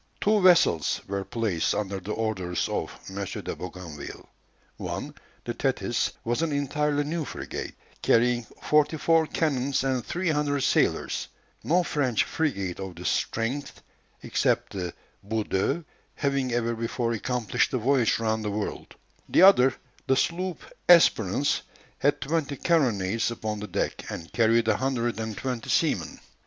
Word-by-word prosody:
Two 210 0 +3
vessels 170 - +4
were 100 0 -2
placed 105 -7 -1
under 100 -2 -2
the 95 +3 -6
orders 95 -6 -1
of - - -2 0.2
M. 100 +1 -4
de 95 - -5
Bougainville. 90 -5 -8 0.5
One, - - -5 0.3
the - - -2
Thetis, - - 0
was 120 +4 0
an 165 -2 0
entirely 145 +1 0
new 160 +2 -2
frigate, - - -6 0.3
carrying 120 0 +3 0.2
forty 150 +1 +3
four 165 +1 +3
cannons 140 -5 0
and 130 -3 0
three 175 0 -2
hundred 145 -2 +1
sailors, - - +1 0.4
no 175 +3 +3
French 135 -8 +1
frigate 100 - -2
of 95 -2 -6
this - - -2
strength, 125 +6 -2 0.4
except - - 0
the 90 -3 -4 0.3
Boudeuse, 110 - -1 0.3
having 140 -3 0
ever 120 0 0
before 115 +1 -2
accomplished 120 0 0
the 130 - -1
voyage 125 -1 +2
round 110 -1 -1
the 105 - -1
world; 105 +1 -4 0.3
the - - +5
other, 135 -10 +7 0.3
the 135 - +4
sloop 175 +5 -1 0.3
Espérance, 140 - +5 0.4
had 145 0 +2
twenty 145 -1 -1
carronades 115 - +1
upon 110 -2 -4
the 105 - -5
deck, 90 - -3
and 85 -1 -7
carried 115 0 +3
a 110 -2 +3
hundred 120 -3 -1
and 110 -2 -4
twenty 125 -4 -4
seamen. - - +1
120 Hz, 145 wpm, -26 LUFS, 105-145 Hz, 0.5 s, other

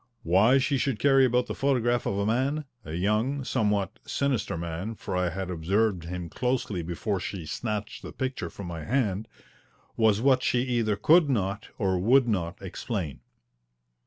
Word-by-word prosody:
Why 100 +10 +5
she 135 +1 +1
should 130 -3 0
carry 135 0 +5
about 125 0 +2
the - - -4
photograph 120 -3 +1
of 100 - -1
a 100 - 0
man 135 +7 0 0.2
a 80 - -7
young, 105 +10 0
somewhat 105 -5 0
sinister 130 -11 -1
man, 85 +6 -4
for 95 - -5
I 90 -1 +1
had 95 +1 -4
observed 95 +2 0
him 90 0 -5
closely 120 -2 -1
before 90 +4 -2
she 90 -2 -5
snatched 110 +6 -4
the - - -8
picture 130 -10 -3
from 100 - -9
my 85 -2 -6
hand 110 - 0 0.7
was 110 -2 +3
what 130 +1 +4
she 125 - +2
either 120 -5 0
could 155 - +5
not, 105 -3 -1
or 95 -3 +1
would 125 +6 +4
not, 95 -4 -1
explain. 95 - -4
105 Hz, 165 wpm, -27 LUFS, 90-125 Hz, 0.7 s, Why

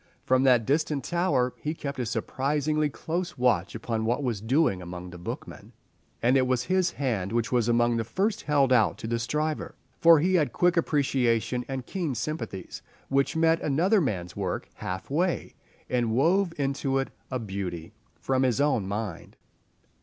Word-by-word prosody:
From 130 0 +3
that 125 -4 +5
distant 145 0 0
tower 145 -8 +1
he 155 +2 -3
kept 140 -3 -5
a 125 - -1
surprisingly 145 +6 0
close 175 +4 -4
watch 115 -7 +1
upon 115 0 -2
what 120 +5 0
was 115 -6 -2
doing 115 - +2
among 90 0 -7
the 90 - -10
bookmen, 85 - -8 0.5
and 125 +3 +4
it 130 -1 +3
was 130 -1 +1
his 185 +1 +1
hand 110 -9 -2
which 115 0 0
was 120 -2 +2
among 120 0 +3
the 115 - 0
first 195 - -1
held 140 -3 +3
out 115 -4 +3
to - - -8
the 115 +1 -1
striver, 150 +6 -2 0.2
for 165 -2 +7
he 180 +5 +1
had 160 -5 +2
quick 175 0 +3
appreciation 130 -6 +1
and 135 -2 -4
keen 170 -7 -3
sympathies 115 - -5 0.3
which 140 +2 +1
met 165 0 +3
another 175 +9 +2
man's 90 - -2
work 95 -3 -3
half 95 +7 -6
way, 175 +4 0 0.3
and 120 -3 0
wove 170 - +3
into 135 -1 0
it 135 - -1 0.2
a 130 - -1
beauty 95 -5 -5 0.3
from 130 -1 0
his 125 -4 +2
own 135 -9 +2
mind. 100 -3 -5
130 Hz, 170 wpm, -27 LUFS, 115-155 Hz, 0.5 s, for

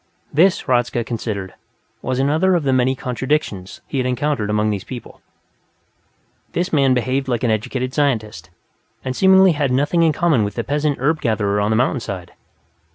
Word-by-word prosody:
This, 175 +6 +4
Hradzka 120 -2 0
considered, 110 -5 -4 0.5
was 130 -1 -2
another 155 +8 +2
of 170 - 0
the 135 -2 +1
many 130 +1 +2
contradictions 125 -6 -3
he 135 - -3
had 125 - 0
encountered 125 -3 -1
among 105 0 +1
these 100 -2 -3
people 125 -3 -10 1.3
this 180 +2 -2
man 135 -3 +4
behaved 130 +3 -1
like 125 -1 -1
an 120 - +2
educated 125 +4 -2
scientist, 125 -8 -1 0.6
and 130 0 -2
seemingly 190 +1 +6
had 145 -3 0
nothing 145 +6 +1
in 165 -1 +4
common 155 -7 +2
with 100 - -4
the 115 - -2
peasant 145 +1 -1
herb 155 +5 0
gatherer 105 -3 0
on 105 - 0
the 110 - +2
mountainside. 105 -8 -2
130 Hz, 165 wpm, -20 LUFS, 110-145 Hz, 1.3 s, seemingly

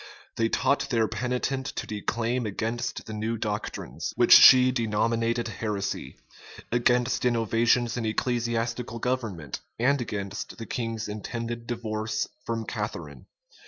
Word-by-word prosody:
They 115 0 +1
taught 140 - +1
their 115 -3 +2
penitent 125 +4 -2
to - - -3
declaim 115 +3 -2
against 115 +3 -3
the 110 - -7
new 110 +2 -2
doctrines, 105 -1 -4
which - - +2
she 130 -1 +9
denominated 115 0 0
heresy; 105 -2 -4 0.5
against 120 +1 +2
innovations 120 0 +2
in 115 -2 -1
ecclesiastical 115 0 -1
government; 110 - -3 0.2
and 130 +3 +2
against 100 -4 -5
the 115 - -6
king's 115 -2 -3
intended 115 +3 -5
divorce 110 -2 -2 0.2
from 115 -1 -2
Catharine. 85 - -5
115 Hz, 120 wpm, -27 LUFS, 110-120 Hz, 0.5 s, she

